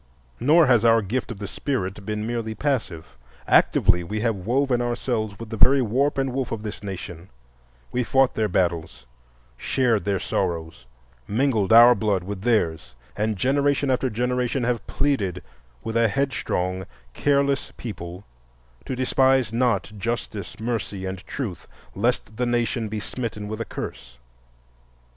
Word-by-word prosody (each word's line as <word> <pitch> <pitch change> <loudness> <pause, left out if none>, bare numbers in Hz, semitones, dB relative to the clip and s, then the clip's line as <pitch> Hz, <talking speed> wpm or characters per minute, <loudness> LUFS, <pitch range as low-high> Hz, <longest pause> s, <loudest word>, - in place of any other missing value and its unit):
Nor 155 +7 +5
has 120 -5 +4
our 115 -1 +5
gift 115 +6 -2
of 115 - -6
the 100 - -6
Spirit 100 -5 -3
been 105 0 -2
merely 115 -1 -3
passive. 115 - -2 0.3
Actively 90 0 +4
we 105 +5 -3
have 115 -1 +1
woven 130 0 +2
ourselves 120 -4 -2
with 115 +1 -9
the 110 - -4
very 135 +4 +5
warp 135 +6 +1
and 135 -2 0
woof 130 -1 -2
of 110 -2 -4
this 105 -1 -6
nation,—we - - -7
fought 135 +2 +3
their 110 -1 0
battles, 85 -9 -1 0.5
shared 120 - +1
their 100 -1 0
sorrow, 85 -3 -2 0.6
mingled 110 -3 +1
our 120 +2 +9
blood 105 -6 0
with 95 0 -6
theirs, 80 - 0 0.2
and 105 0 -1
generation 140 +3 +2
after 130 +1 +1
generation 125 +2 -1
have 120 0 -1
pleaded 100 - -1 0.4
with 115 - -4
a 115 0 +4
headstrong, 95 -7 -1 0.3
careless 140 -1 +1
people 90 -4 -7 0.6
to 130 - -3
despise 130 -2 +2
not 115 -4 +1
Justice, 110 -3 -4
Mercy, 110 -4 -3
and 95 0 -4
Truth, 115 -11 -5 0.3
lest 110 0 -1
the 125 0 0
nation 120 -1 0
be 105 0 -4
smitten 105 -1 -5
with 110 +2 -4
a - - -2
curse. - - -7
115 Hz, 145 wpm, -24 LUFS, 95-125 Hz, 0.6 s, our